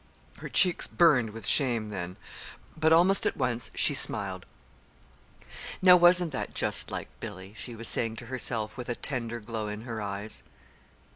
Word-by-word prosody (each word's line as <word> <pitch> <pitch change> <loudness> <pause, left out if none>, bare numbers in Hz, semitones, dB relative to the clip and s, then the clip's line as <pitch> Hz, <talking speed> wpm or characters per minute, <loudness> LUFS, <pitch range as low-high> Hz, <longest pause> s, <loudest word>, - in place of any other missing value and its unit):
Her - - -8
cheeks 180 -3 +3
burned 140 -10 +3
with 110 -1 -9
shame 120 -6 +2
then. 90 -2 -6 0.6
But 160 0 +1
almost 180 +4 +4
at - - -3
once 120 -1 -2
she - - +3
smiled. - - -1 1.3
"Now 180 -1 +7
wasn't 175 -1 +5
that 135 - -5
just - - +2
like - - -6
Billy?" 100 -3 -9
she 120 +1 -6
was 115 +1 -3
saying 115 -1 +1
to 120 - -9
herself, 115 -2 -3
with 125 - -7
a 120 - -2
tender 120 -4 -4
glow 110 0 -5
in 105 +1 -6
her 115 -2 -6
eyes. 100 +1 -5
115 Hz, 160 wpm, -28 LUFS, 110-150 Hz, 1.3 s, Now